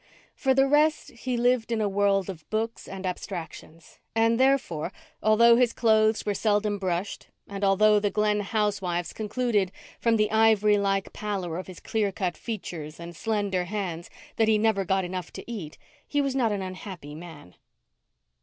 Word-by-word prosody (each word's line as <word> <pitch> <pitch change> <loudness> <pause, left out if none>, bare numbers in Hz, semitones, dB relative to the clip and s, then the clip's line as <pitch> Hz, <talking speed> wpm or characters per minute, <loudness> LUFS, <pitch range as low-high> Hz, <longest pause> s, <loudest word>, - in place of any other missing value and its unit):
For 265 -1 +1
the 270 0 +4
rest, 300 +2 +2
he 245 0 -3
lived 245 -1 +2
in 230 - +1
a 215 - +1
world 195 -1 +2
of 165 -6 -8
books 225 +1 -3
and 190 0 -7
abstractions; 170 -3 -7 0.2
and, 225 +1 +3
therefore, 260 - +1 0.3
although 230 +2 +6
his 245 -2 +3
clothes 220 -1 +3
were 205 - 0
seldom 205 0 +1
brushed, 185 +1 -3 0.2
and 200 0 -6
although 210 +2 +5
the 205 0 0
Glen 210 0 +1
housewives 200 -4 -1
concluded, 215 -3 0 0.3
from 230 -1 +2
the 210 0 +1
ivory 215 -2 +4
like 195 -1 0
pallor 195 -6 -3
of 185 - -7
his 185 -2 -10
clear 215 -3 -1
cut 185 -3 -2
features 165 -8 -6
and 170 0 -8
slender 205 -3 -1
hands, 175 -4 -4 0.3
that 225 - +3
he 220 -1 +4
never 210 -3 +1
got 190 +1 +1
enough 180 -1 -5
to - - -7
eat, 200 -10 -7 0.3
he 290 - 0
was 275 -2 0
not 240 -5 +2
an 200 -2 -2
unhappy 185 -5 -8
man. 155 - -11
205 Hz, 170 wpm, -26 LUFS, 185-225 Hz, 0.3 s, although